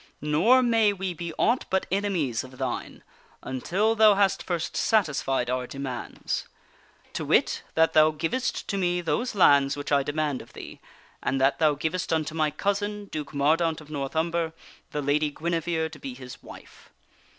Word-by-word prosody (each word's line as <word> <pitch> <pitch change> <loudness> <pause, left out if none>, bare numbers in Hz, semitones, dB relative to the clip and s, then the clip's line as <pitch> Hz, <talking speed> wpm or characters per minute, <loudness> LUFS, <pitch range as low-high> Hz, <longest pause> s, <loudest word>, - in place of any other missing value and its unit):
Nor 185 +13 +4
may 225 -3 +4
we 190 -2 -3
be 170 0 -5
aught 240 +3 +2
but 190 0 +1
enemies 180 - 0
of 130 0 -12
thine 130 -2 -4 0.4
until 185 - 0
thou 215 -2 +6
hast 195 -1 +2
first 170 -2 -3
satisfied 150 - +1
our 125 0 -2
demands; 135 -2 -5 0.7
to - - -3
wit, - - +2
that 160 0 +3
thou 155 0 +6
givest 165 +12 -2
to 200 - -1
me 175 -1 +1
those 230 +7 -1
lands 140 -6 +5
which 145 - -5
I 140 -1 +4
demand 145 -1 -2
of - - -16
thee - - -10 0.4
and 135 - -1
that 135 +1 +2
thou 155 -2 +3
givest 160 +5 -2
unto 155 -2 0
my 155 -1 +1
cousin, 205 +4 -2
Duke 150 -2 -5
Mordaunt 160 +3 +2
of 155 -1 -14
The - - -12
King - - -4
and - - -3
North 135 +3 -5
Umber, 165 0 0 0.4
the 150 - -3
Lady 150 +2 +1
Guinevere 165 +1 -1
to 155 -2 -12
be 135 -2 -7
his 125 -1 -10
wife. - - -14
160 Hz, 180 wpm, -26 LUFS, 145-190 Hz, 0.7 s, thou